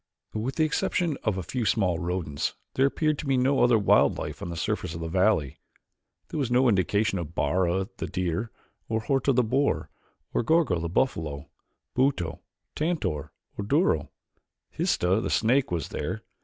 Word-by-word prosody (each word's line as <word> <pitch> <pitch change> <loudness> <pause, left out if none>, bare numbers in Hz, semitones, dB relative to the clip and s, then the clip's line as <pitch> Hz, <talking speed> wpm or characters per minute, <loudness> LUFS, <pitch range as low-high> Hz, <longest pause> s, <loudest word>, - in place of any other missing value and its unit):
With 115 +5 -2
the 160 - +2
exception 155 +1 0
of 105 -4 0
a 95 - -3
few 125 +8 -3
small 95 -6 +1
rodents 85 -4 -2 0.2
there 135 +1 +4
appeared 155 +1 0
to 150 - -5
be 135 -1 +2
no 135 +2 +3
other 120 -2 +5
wild 100 - +4
life - - -5
on - - -4
the 85 - -5
surface 80 0 -2
of - - -5
the 80 - -4
valley. 90 -5 +1 0.7
There 155 - -3
was 135 -4 0
no 125 +2 +4
indication 100 0 +2
of 85 0 -6
Bara, 95 +1 +1
the - - -3
deer, 90 +4 -2 0.4
or 110 -1 0
Horta, 135 +3 +1
the 125 -1 +3
boar, 135 +5 0 0.4
or - - +2
of 115 - -9
Gorgo, 160 - +3
the 85 0 -3
buffalo, 80 - -1 0.5
Buto, 130 -11 +1 0.3
Tantor, 115 - -2 0.2
or 100 - -4
Duro. 105 - +2 0.6
Histah, 95 +5 +1
the - - -2
snake, 130 +4 +2
was 85 -4 -2
there. - - -4
110 Hz, 175 wpm, -27 LUFS, 85-135 Hz, 0.7 s, other